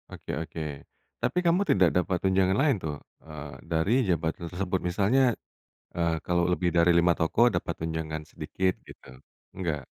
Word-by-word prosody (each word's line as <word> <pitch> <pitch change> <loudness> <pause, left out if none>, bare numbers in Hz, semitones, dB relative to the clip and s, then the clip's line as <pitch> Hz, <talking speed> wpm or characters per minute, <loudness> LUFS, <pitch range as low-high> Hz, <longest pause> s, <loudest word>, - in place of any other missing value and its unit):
Oke - - -8
oke. 80 0 -6 0.6
Tapi - - -1
kamu 170 +3 +4
tidak 90 -3 +5
dapat 90 +1 +1
tunjangan 95 0 +2
lain 140 -2 +3
tuh, 75 -2 -4 0.2
eee, 75 -2 -9
dari 80 - 0 0.2
jabatan 85 0 -1
tersebut 95 +1 -2
misalnya, 110 +8 +2 0.5
eee, 85 -1 0
kalau 85 -1 +1
lebih 90 0 +1
dari 85 0 +4
5 85 0 +4
toko 115 +9 +3
dapat - - -2
tunjangan 80 -1 -3
sedikit 95 +4 -2
gitu, 65 0 -14 0.3
enggak? 80 -7 -3
85 Hz, 150 wpm, -27 LUFS, 80-95 Hz, 0.6 s, tidak